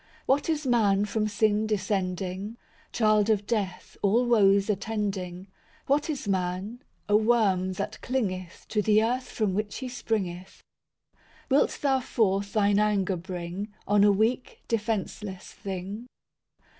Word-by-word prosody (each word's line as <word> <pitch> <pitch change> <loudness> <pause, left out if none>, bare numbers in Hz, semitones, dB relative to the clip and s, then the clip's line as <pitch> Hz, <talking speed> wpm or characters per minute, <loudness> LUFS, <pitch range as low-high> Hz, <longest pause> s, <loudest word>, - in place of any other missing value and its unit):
II - - -31 0.2
What 280 +4 +2
is 305 -2 0
man 210 -5 +3
from 215 +1 -1
sin 215 +1 +1
descending? 195 0 -2 0.3
Child 215 -2 +3
of 205 -2 +2
death, 200 -5 -3
all 225 +5 +3
woes 200 -4 +4
attending. 195 -3 -2 0.4
What 295 +3 +1
is 280 -8 -3
man? 190 +5 -2 0.3
a 205 - +3
worm 210 -5 +3
that - - -5
clingeth 185 -9 -3
To 210 - +1
the 215 +1 +4
earth 250 +3 -1
from 210 -4 -1
which 205 +1 -2
he 260 - -5
springeth. 195 -7 -4 0.9
Wilt 275 - +3
Thou 270 -2 +3
forth 200 -5 0
Thine 205 -1 +3
anger 205 -3 +1
bring, 180 +3 -5 0.2
On 205 0 +4
a 205 - +6
weak, 220 +5 0
defenceless 210 -3 -3
thing? 195 +4 -6
210 Hz, 135 wpm, -27 LUFS, 190-225 Hz, 0.9 s, a